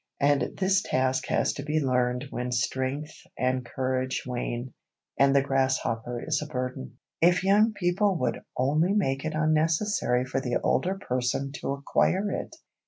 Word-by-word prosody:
And 140 0 +1
this 190 0 +3
task 130 0 0
has - - +1
to - - -6
be 155 +2 0
learned 125 -1 0
when 125 0 -3
strength 130 +5 -2 0.2
and 130 0 0
courage 130 +1 -2
wane, 125 0 -4 0.5
and 140 0 +5
the 140 - +5
grasshopper 130 -3 -1
is 155 -2 0
a 150 - -5
burden. 125 - -4 0.2
If 175 +2 +4
young 210 +3 +4
people 190 0 +1
would 125 - -1 0.2
only 150 +8 +2
make 135 -10 0
it 155 0 -2
unnecessary 155 -3 +1
for 135 +1 -2
the 125 -2 -2
older 190 +2 +1
person 130 -3 -1
to - - -2
acquire 185 +8 +1
it! 315 - -4
135 Hz, 155 wpm, -27 LUFS, 130-165 Hz, 0.5 s, and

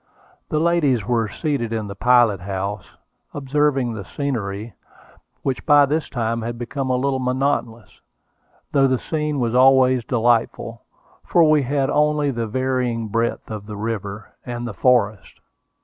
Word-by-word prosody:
The 155 - -1
ladies 155 - +2
were 115 -1 +1
seated 135 - -2
in 110 -2 -2
the 100 - -6
pilot 120 -4 +3
house, 100 +1 -4 0.5
observing 140 -3 0
the 105 -3 -6
scenery, 110 -2 -4 0.7
which 135 -2 -2
by 145 -2 +6
this 155 +3 -2
time 115 -2 -2
had 120 +1 -4
become 130 +3 -4
a 130 - +2
little 135 +1 0
monotonous, 125 -3 -2 0.7
though 135 -1 +4
the 130 -1 +1
scene 150 +1 -2
was 120 -2 0
always 130 -1 +5
delightful, 115 -1 0 0.4
for 170 - +3
we 155 -2 +4
had 135 +1 0
only 150 -1 +2
the 115 -3 -3
varying 125 -2 -1
breadth 115 +1 -2
of 105 -1 -7
the 105 -1 -7
river, 105 -1 -5
and 120 -1 -5
the 115 - -5
forest. 110 -1 +1
125 Hz, 150 wpm, -21 LUFS, 110-140 Hz, 0.7 s, by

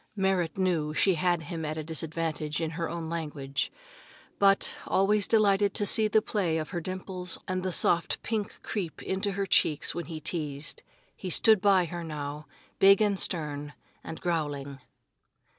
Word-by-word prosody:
Merrit 190 -4 0
knew 165 -5 0
she 190 - +4
had 175 0 +1
him 160 +1 -5
at 155 0 -3
a 155 - -3
disadvantage 160 -1 -3
in 160 -1 -2
her 165 0 -3
own 170 -1 -4
language, 150 -4 -3 0.7
but, 195 0 +3
always 200 +1 +3
delighted 205 -2 +3
to 205 - +2
see 215 +2 +6
the 215 0 +3
play 180 -8 0
of 155 -1 -4
her 175 - -3
dimples 185 0 -4
and 185 0 -1
the 185 0 -2
soft 170 0 +2
pink 215 -3 -3
creep 185 -7 -4
into 195 +1 -1
her 200 0 -1
cheeks 155 -5 +2
when 175 - -5
he 160 -2 -6
teased, 150 -3 -3 0.3
he 185 - -6
stood 215 +3 +5
by 195 -3 +4
her 170 +1 -6
now, 150 -1 -6 0.3
big 195 0 +7
and 205 -3 +2
stern, 150 -3 -3 0.3
and 160 - -7
growling. 145 -5 -2
170 Hz, 165 wpm, -28 LUFS, 155-195 Hz, 0.7 s, big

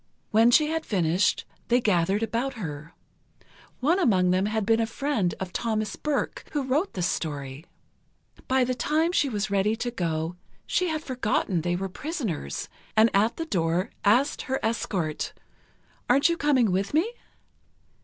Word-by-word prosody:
When 225 +2 +5
she 305 +5 +4
had 325 0 -1
finished, 180 -1 +1 0.2
they 240 +1 +4
gathered 200 -1 +1
about 235 +5 -2
her. 160 -6 -7 0.9
One 330 +8 +3
among 185 - +3
them 185 +2 +2
had 215 -1 -1
been 225 +1 +3
a 225 - +1
friend 230 - -1
of 185 -1 -5
Thomas 215 -3 -1
Burke, 300 -2 -2
who 290 -2 0
wrote 285 +9 0
the 180 - -2
story. 145 -3 -3 0.8
By 260 0 +3
the 255 +1 0
time 310 +7 +1
she 290 -6 +2
was 210 -3 -2
ready 200 +2 +2
to 240 +2 -3
go, 165 -4 -2 0.3
she 365 - +1
had 315 -2 -2
forgotten 215 - 0
they 175 +2 0
were 195 +2 -2
prisoners, 200 - -4 0.3
and 220 +1 +6
at 215 +4 +2
the 330 - -3
door 175 - 0
asked 245 +8 +3
her 265 - 0
escort: 190 -8 -2 0.8
"Aren't 275 +6 +5
you 335 - +1
coming 270 - +2
with 195 +8 -1
me?" 395 +10 +2
220 Hz, 160 wpm, -26 LUFS, 180-270 Hz, 0.9 s, and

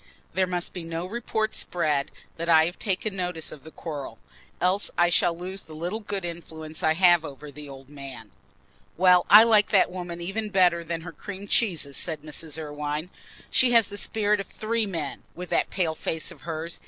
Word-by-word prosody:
There 185 -1 +2
must 180 -1 -2
be 180 - -6
no 165 +1 -4
report 220 +1 -2
spread 150 -5 0 0.3
that 170 +1 -3
I 160 -1 +7
have 175 +2 -5
taken 200 0 -1
notice 180 -4 -2
of 140 - -11
the 160 - -10
quarrel, 150 -4 -7 0.4
else 185 +3 +2
I 175 0 +5
shall 170 -1 +2
lose 190 +2 -5
the 155 - -11
little 175 +7 -3
good 200 -4 -4
influence 160 -2 -7
I 160 - +3
have 175 -2 +5
over 145 0 -9
the 150 0 -10
old 135 -1 -11
man." 140 -2 -9 0.7
"Well, 180 0 +5
I 210 +2 +11
like 215 -3 +5
that - - +4
woman 175 -2 -6
even 200 +5 -3
better 180 -3 +3
than 165 0 -4
her 175 +1 -8
cream 195 +5 -8
cheeses," 165 - +1
said 155 -3 -2
Mrs. 155 0 -2
Irwine. 150 +2 -4 0.4
"She 250 -1 +4
has 230 -3 +6
the 205 - -6
spirit 210 0 +1
of 195 - -5
three 220 0 -1
men, 165 -7 -4
with 180 +1 -8
that - - +2
pale 175 -4 0
face 160 0 -3
of - - -14
hers. 165 0 -5
175 Hz, 195 wpm, -26 LUFS, 160-195 Hz, 0.7 s, I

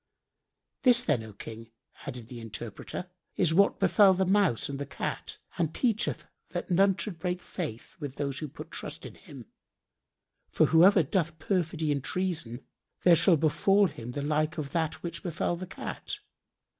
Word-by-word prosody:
"This, 245 -1 +5
then, 145 -7 +2
O 110 -1 -9
King," 115 +2 -9 0.4
added 125 -4 -6
the 120 0 -8
interpreter, 115 - -6 0.3
"is 170 -4 +3
what 200 +4 +4
befel 195 -3 +6
the 190 +1 +1
Mouse 190 - +2
and 140 -1 -5
the 140 - -3
Cat - - -4 0.2
and 160 -2 0
teacheth 230 -4 0 0.2
that - - -4
none 195 +2 +4
should 195 -7 -4
break 180 +2 -1
faith 155 - -6
with 145 -4 -5
those 140 -2 -2
who 155 - -4
put - - -10
trust - - -6
in - - -8
him; - - -13 1.0
for - - +4
who 160 +1 +5
ever 190 -2 +7
doth 165 +1 -1
perfidy 165 -4 0
and 140 -2 -1
treason, 165 -11 -2 0.4
there 175 -2 +7
shall 165 +1 +5
befal 170 +7 +3
him 125 -8 -5
the 145 - -3
like 155 +2 0
of 145 -3 -4
that 160 -1 -1
which 170 -1 -4
befel 175 -1 -1
the 185 +2 -7
Cat. - - -6
160 Hz, 170 wpm, -29 LUFS, 140-185 Hz, 1.0 s, ever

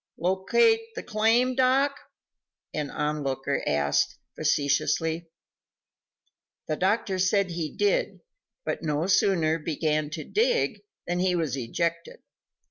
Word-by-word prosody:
"Locate 190 - +3
the - - -5
claim, 225 +4 +2
Doc?" 265 +2 +3 0.8
an 150 -2 -2
on 150 +1 -2
looker 135 0 -2
asked, 70 0 +1 0.2
facetiously. 160 +3 0 1.4
The 155 - 0
doctor 190 +2 0
said 190 0 +2
he 165 -2 -3
did, - - 0 0.4
but - - -2
no 150 0 -1
sooner 170 -4 +2
began 155 -1 -1
to 155 0 -5
dig 475 +2 +1 0.2
than 175 0 -1
he 180 0 +2
was 160 -6 -1
ejected. 170 +7 -3
170 Hz, 115 wpm, -26 LUFS, 150-215 Hz, 1.4 s, Locate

